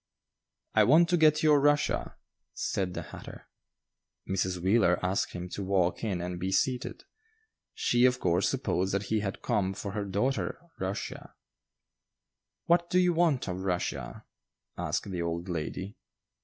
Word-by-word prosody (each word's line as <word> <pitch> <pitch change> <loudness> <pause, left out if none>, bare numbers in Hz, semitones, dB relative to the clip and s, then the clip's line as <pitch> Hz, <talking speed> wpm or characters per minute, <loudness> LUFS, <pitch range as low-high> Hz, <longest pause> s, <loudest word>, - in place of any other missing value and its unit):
"I - - +5
want 165 +6 +5
to 180 - +4
get 155 -1 +4
your 150 -2 +6
Russia," 145 +1 +1 0.4
said 90 -2 -2
the - - -4
hatter. - - -11 0.8
Mrs. 95 -1 -1
Wheeler 95 0 +3
asked 95 +2 0
him 90 0 -5
to 100 - -5
walk 95 -1 +1
in 95 -6 -1
and 90 0 -4
be 95 +2 -2
seated. 125 +5 -1 0.7
She, 120 +1 +3
of 125 0 +3
course, 90 -1 +2
supposed 95 +2 -1
that 100 - 0
he 110 - +3
had 100 -2 -4
come 95 -1 0
for 100 - -5
her 100 +1 -3
daughter 105 +8 -1 0.2
"Rushia." 95 +1 -5 1.3
"What 170 0 +3
do 180 - +2
you 180 -1 +4
want 160 -8 +2
of 90 -1 -3
Rushia?" 95 -2 -3 0.5
asked 100 - -2
the 90 -2 -3
old 85 +1 -3
lady. 90 +3 -4
100 Hz, 150 wpm, -29 LUFS, 90-135 Hz, 1.3 s, your